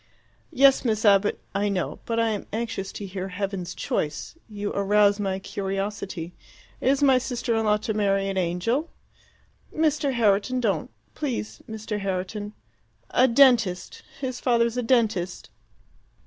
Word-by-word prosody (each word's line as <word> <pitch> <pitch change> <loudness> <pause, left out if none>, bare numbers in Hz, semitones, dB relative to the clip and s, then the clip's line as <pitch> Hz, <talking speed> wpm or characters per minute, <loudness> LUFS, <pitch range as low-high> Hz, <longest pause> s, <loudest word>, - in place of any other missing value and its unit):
"Yes, 275 -2 +5
Miss 220 -3 0
Abbott, 200 0 +4
I 200 +1 0
know. 185 -3 -2
But 230 0 0
I 230 0 +2
am 210 -2 -3
anxious 220 -3 -3
to 205 - -6
hear 190 0 -5
heaven's 195 -1 -4
choice. 150 - -3 0.2
You 205 -1 -4
arouse 205 +1 +3
my 195 -2 -1
curiosity. 195 -3 -4 0.5
Is 275 +2 +2
my 265 -2 +5
sister 245 -2 -2
in 225 0 +1
law 210 0 +4
to 215 +1 -3
marry 195 -2 +1
an 195 - -2
angel?" 190 - 0 0.8
"Mr. 305 -3 +1
Herriton, 230 +2 +2
don't 200 -10 0 0.2
please, 255 -7 -4
Mr. 220 -1 -4
Herriton 195 +2 -3 0.6
a 255 - +5
dentist. 235 -8 +3 0.2
His 255 -2 -4
father's 235 -2 +2
a 250 - 0
dentist." 225 -7 0
210 Hz, 140 wpm, -25 LUFS, 195-240 Hz, 0.8 s, Yes